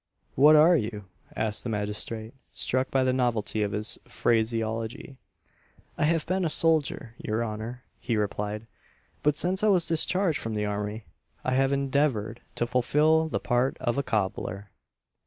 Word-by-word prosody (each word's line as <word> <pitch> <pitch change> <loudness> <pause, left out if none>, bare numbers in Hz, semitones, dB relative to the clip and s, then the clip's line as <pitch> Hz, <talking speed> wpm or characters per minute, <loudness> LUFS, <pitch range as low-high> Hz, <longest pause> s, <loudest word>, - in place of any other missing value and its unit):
"What 150 +4 +7
are 160 +4 +7
you?" 105 -7 -2 0.3
asked 110 -1 -1
the 120 - -3
magistrate, 110 +1 -4 0.2
struck 130 +1 -1
by 135 -1 +2
the 130 0 +2
novelty 115 -4 0
of 105 -1 0
his 105 +2 -1
phraseology. 115 +2 -1 0.8
"I - - +1
have 165 0 +1
been 185 +2 0
a 165 - +1
soldier, 155 -7 +1
your 110 +1 -1
honour," 115 +3 -6 0.2
he 115 - -1
replied; 105 +1 -2 0.6
"but 150 0 +2
since 185 +4 +1
I - - +4
was 185 -5 +4
discharged 170 +1 +1
from 115 -1 -4
the 105 0 -1
army, 105 +1 -3 0.4
I 130 - -1
have 135 +1 +2
endeavoured 135 -5 0
to 120 - 0
fulfil 150 +6 +3
the - - -2
part 125 +1 0
of 120 -3 0
a 140 - +1
cobbler." 100 -4 -2
120 Hz, 155 wpm, -27 LUFS, 110-150 Hz, 0.8 s, What